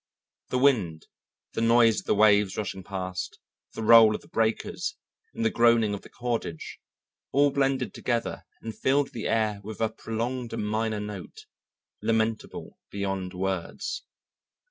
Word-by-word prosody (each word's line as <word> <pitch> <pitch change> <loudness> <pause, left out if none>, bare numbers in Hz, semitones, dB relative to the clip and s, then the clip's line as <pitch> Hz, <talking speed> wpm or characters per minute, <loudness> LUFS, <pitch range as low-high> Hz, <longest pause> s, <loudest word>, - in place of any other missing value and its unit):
The 125 - 0
wind, 105 - +2 0.5
the - - -2
noise 115 -1 +5
of - - -12
the - - +3
waves 105 -2 +4
rushing 100 -2 -3
past, 95 -1 -5 0.4
the 110 - -5
roll 110 -1 +8
of - - -6
the - - -18
breakers 110 0 -1 0.4
and 115 - -1
the 110 - +3
groaning 115 -3 +4
of 100 - -5
the - - -14
cordage 115 -9 -4 0.5
all 145 +1 +4
blended 135 -5 0
together 120 -1 -2 0.2
and 110 -2 -6
filled 135 +5 +1
the 115 - -3
air 110 -2 +1
with 110 0 -8
a 110 -1 +1
prolonged 120 +3 -4
minor 110 +1 -1
note, 105 -3 -8 0.6
lamentable 110 -1 -2
beyond 95 -2 -3
words. 95 -2 -3
110 Hz, 145 wpm, -27 LUFS, 100-115 Hz, 0.6 s, roll